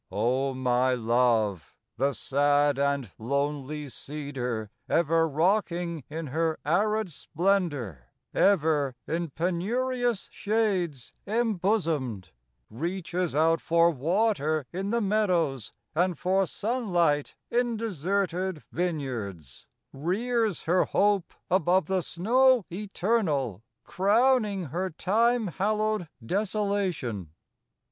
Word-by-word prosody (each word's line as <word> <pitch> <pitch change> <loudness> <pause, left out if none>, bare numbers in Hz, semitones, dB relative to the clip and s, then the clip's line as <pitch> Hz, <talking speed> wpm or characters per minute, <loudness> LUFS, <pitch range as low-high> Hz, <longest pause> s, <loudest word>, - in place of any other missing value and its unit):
O 130 +3 0
my 125 0 +2
Love, 115 -6 +1 0.2
the 140 +1 +1
sad 145 +3 +2
and 140 -6 0
lonely 140 +4 -2
Cedar, 130 -6 -5 0.2
Ever 165 0 +3
rocking 170 - 0
in 160 +2 -5
her 160 +3 -1
arid 210 +5 +1
splendor, 145 - -1 0.3
Ever 155 -8 +3
in 170 0 -2
penurious 230 - -1
shades 195 - -1
embosomed, 185 - 0 0.4
Reaches 175 - -3
out 165 +2 +3
for 170 +1 +4
water 155 - +1
in 190 +3 -3
the 235 +2 +1
meadows 180 - +1 0.2
43 165 +3 +3
And 180 -3 -2
for 190 +3 +1
sunlight 175 - 0 0.2
in 240 -1 +1
deserted 190 -3 -1
vineyards;— 120 - -4 0.3
Rears 210 - 0
her 180 +3 +2
hope 200 -3 +1 0.2
above 185 0 +3
the 190 +2 0
snow 240 +7 +3
eternal 175 - -1 0.2
Crowning 210 +1 +2
her 185 +2 -1
Time 225 +7 +1
hallowed 215 +1 0 0.2
desolation. 190 - -1
170 Hz, 95 wpm, -27 LUFS, 140-200 Hz, 0.4 s, for